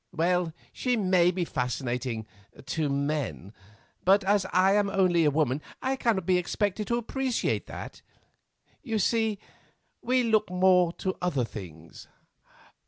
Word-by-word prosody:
Well, 175 0 +1 0.2
she 250 -2 0
may 185 -4 +3
be 180 -1 -1
fascinating—to 125 +1 -4
men, 140 - -2 0.5
but 195 +2 +4
as 195 0 +2
I 190 +1 +4
am 205 -1 +2
only 180 -4 +3
a - - +5
woman, 145 -2 0 0.2
I 265 +1 -1
cannot 225 -8 0
be 180 0 +3
expected 205 +3 -2
to 235 - +1
appreciate 255 +1 -1
that. - - -8 0.8
You 225 -4 -2
see 220 0 +1 0.6
we 255 +1 +2
look 220 -3 +2
more 180 -1 +4
to 185 +1 -3
other 145 -9 0
things." 85 -7 -10
180 Hz, 130 wpm, -27 LUFS, 145-210 Hz, 0.8 s, a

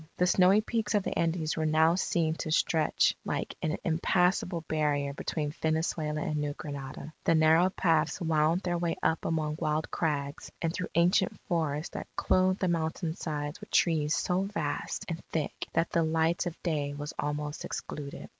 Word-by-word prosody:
The 180 - +3
snowy 185 +3 +5
peaks 220 -1 -1
of 205 - +2
the - - -3
Andes 165 -1 0
were 155 -1 0
now 160 +1 +4
seen 170 -3 +1
to - - -4
stretch 155 0 +2
like - - -3
an 155 - -1
impassable 180 +1 +1
barrier 150 -3 0
between 150 +1 -3
Venezuela 155 -1 0
and 150 - -1
New 145 -1 -1
Granada. 145 +1 -7
The 165 - +3
narrow 160 +3 +5
paths 165 -4 +1
wound 160 0 +2
their 175 -2 -1
way 170 -1 0
up 160 - +1
among 155 -2 -1
wild 155 0 -1
crags, 145 -3 -2
and 165 -1 -1
through 180 - -3
ancient 180 +3 +3
forests 155 -2 -2
that - - -5
clothed 185 +1 +2
the 185 - +2
mountain 165 0 -1
sides 150 0 -4
with 210 - -10
trees 155 -3 +2
so 180 +1 +1
vast 195 -7 -3
and 165 -1 -4
thick 155 -3 -3
that 165 0 +1
the 170 - +2
light 160 +2 +1
of 170 - -6
day 145 -4 -1
was 145 +1 -5
almost 150 +1 -3
excluded. 145 -1 -6
160 Hz, 175 wpm, -29 LUFS, 150-175 Hz, -, snowy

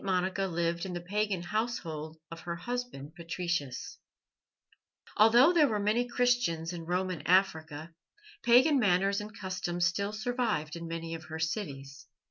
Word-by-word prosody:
MONICA 190 0 0
LIVED 170 0 -1
IN 180 - -5
THE 175 - -4
PAGAN 200 0 -1
HOUSEHOLD 170 -8 -3
OF 165 - -7
HER 170 +1 -5
HUSBAND 240 - -5
PATRICIUS 170 -5 -4 1.2
Although 240 +9 +6
there 315 -4 +5
were 220 -4 0
many 215 +4 +1
Christians 240 -10 +1
in 165 -2 -6
Roman 180 -2 -1
Africa, 160 -4 +1 0.5
pagan 260 +5 +5
manners 200 -1 +2
and 210 0 -9
customs 185 -2 -2
still 200 +4 0
survived 215 - -1
in 170 0 -6
many 165 0 -5
of 165 -1 -7
her 160 0 -6
cities. 140 - -4
180 Hz, 140 wpm, -30 LUFS, 165-215 Hz, 1.2 s, Although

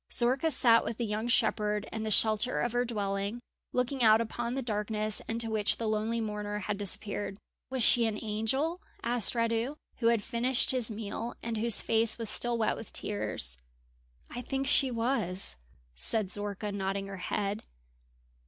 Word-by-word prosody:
Zorka 260 +6 +2
sat 235 -5 +4
with 230 - -4
the 235 - -1
young 215 +2 -2
shepherd 210 -3 +1
in 220 - -4
the 220 - -2
shelter 215 +3 +3
of 240 - 0
her 245 +1 +1
dwelling, 200 -1 -2 0.3
looking 250 +2 -1
out 220 -1 +6
upon 235 +2 -3
the 270 - -2
darkness 215 -1 -2
into 225 0 -2
which 210 -1 +3
the 230 - -4
lonely 215 +2 -1
mourner 210 -1 -3
had 210 0 -3
disappeared. 205 0 -1 0.3
"Was 260 -2 0
she 235 0 +5
an 215 -1 -2
angel?" 265 - -1 0.2
asked 240 0 +2
Radu, 230 +4 0 0.2
who 230 - +1
had 230 -3 +3
finished 240 +3 +2
his 250 -3 +2
meal, 225 +2 -5
and 230 -1 -3
whose 230 0 +4
face 225 0 +2
was 230 -3 +1
still 240 -1 +2
wet 220 - +1
with 225 - -10
tears. 65 - -1 0.7
"I 245 - -6
think 270 +2 -3
she 275 -1 +4
was," 230 - -1 0.4
said 190 - 0
Zorka, 205 +1 -2
nodding 195 0 -2
her 195 0 -7
head. 200 +3 -2
225 Hz, 170 wpm, -30 LUFS, 210-240 Hz, 0.7 s, out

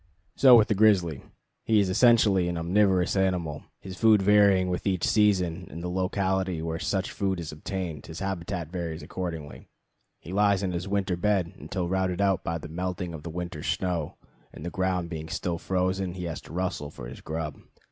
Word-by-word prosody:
So 130 -3 +8
with 110 - +4
the - - +2
grizzly. 95 -8 +3 0.4
He 110 -1 +3
is 100 - +2
essentially 105 -3 +4
an 85 -1 -2
omnivorous 95 +2 +2
animal: 90 -6 -1 0.2
his 95 -1 -8
food 110 +1 +5
varying 100 -2 +4
with 90 +2 -2
each 95 -3 0
season 90 -5 +2
and 85 - -8
the 90 - -3
locality 95 -1 0
where 80 0 -3
such 95 0 -1
food 95 -2 -1
is 80 -3 -5
obtained, 80 -1 -5
his 80 - -8
habitat 90 -3 -4
varies 85 -3 -4
accordingly. 80 -5 -6 0.5
He 85 - -9
lies 100 -1 +3
in 95 - -1
his 90 +2 -3
winter 100 -2 0
bed 95 -1 0
until 90 -3 -4
routed 95 0 0
out 95 -2 +2
by 85 0 -2
the 80 - -8
melting 90 +1 -4
of 80 - -7
the 85 - -7
winter 85 -1 -5
snow, 85 -2 -2 0.3
and 75 - -10
the 85 - -3
ground 90 -2 -1
being 80 -1 -5
still 85 -2 -2
frozen, 95 0 -1
he 90 - -5
has 85 -2 -4
to - - -14
rustle 90 -4 -2
for 60 - -9
his 60 - -10
grub. 80 -2 -5
90 Hz, 190 wpm, -27 LUFS, 85-95 Hz, 0.5 s, So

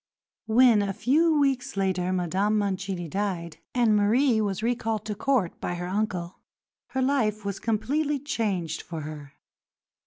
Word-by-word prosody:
When, 230 -1 +5
a 200 -1 -1
few 310 - +3
weeks 270 -4 0
later, 185 -2 0
Madame 185 +4 +1
Mancini 190 -3 -2
died, 180 -2 -3 0.2
and 235 -4 +4
Marie 220 +3 +3
was 200 0 -2
recalled 225 -3 -1
to 215 - -2
Court 220 -5 0
by 175 - -2
her 175 0 -4
uncle, 185 -2 -2 0.5
her 260 0 -1
life 220 -6 +1
was 200 -1 -3
completely 280 +7 0
changed 200 - -2
for 165 -2 -6
her. 145 -2 -8
210 Hz, 145 wpm, -26 LUFS, 185-245 Hz, 0.5 s, When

